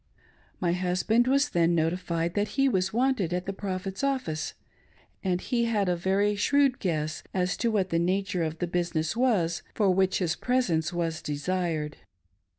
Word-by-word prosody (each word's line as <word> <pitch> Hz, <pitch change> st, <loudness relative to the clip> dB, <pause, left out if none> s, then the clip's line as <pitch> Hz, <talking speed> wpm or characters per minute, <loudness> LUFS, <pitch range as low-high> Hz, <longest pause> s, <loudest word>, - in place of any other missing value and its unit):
My 175 Hz, -2 st, +1 dB
husband 185 Hz, +7 st, +1 dB
was 275 Hz, +2 st, +3 dB
then 170 Hz, 0 st, +2 dB
notified 170 Hz, 0 st, 0 dB
that 205 Hz, 0 st, 0 dB
he 275 Hz, 0 st, +4 dB
was 190 Hz, -6 st, +1 dB
wanted 240 Hz, -7 st, +1 dB
at 180 Hz, -, -3 dB
the 195 Hz, -, -3 dB
Prophet's 195 Hz, +1 st, -4 dB
office, 255 Hz, -, -1 dB, 0.7 s
and 180 Hz, -2 st, +1 dB
he 235 Hz, +4 st, 0 dB
had 210 Hz, -4 st, +1 dB
a 180 Hz, -, +2 dB
very 195 Hz, +4 st, +1 dB
shrewd 275 Hz, +5 st, +2 dB
guess^as 175 Hz, +2 st, -2 dB
to 235 Hz, -, +1 dB
what 200 Hz, -4 st, +1 dB
the 165 Hz, -, +2 dB
nature 185 Hz, +1 st, 0 dB
of 160 Hz, 0 st, -2 dB
the 175 Hz, -, -1 dB
business 170 Hz, -1 st, -1 dB
was 210 Hz, -10 st, +1 dB
for 200 Hz, -4 st, +3 dB
which 190 Hz, 0 st, +2 dB
his 170 Hz, -4 st, 0 dB
presence 190 Hz, -12 st, 0 dB
was 165 Hz, -2 st, -2 dB
desired. 155 Hz, 0 st, -2 dB
185 Hz, 160 wpm, -27 LUFS, 170-210 Hz, 0.7 s, he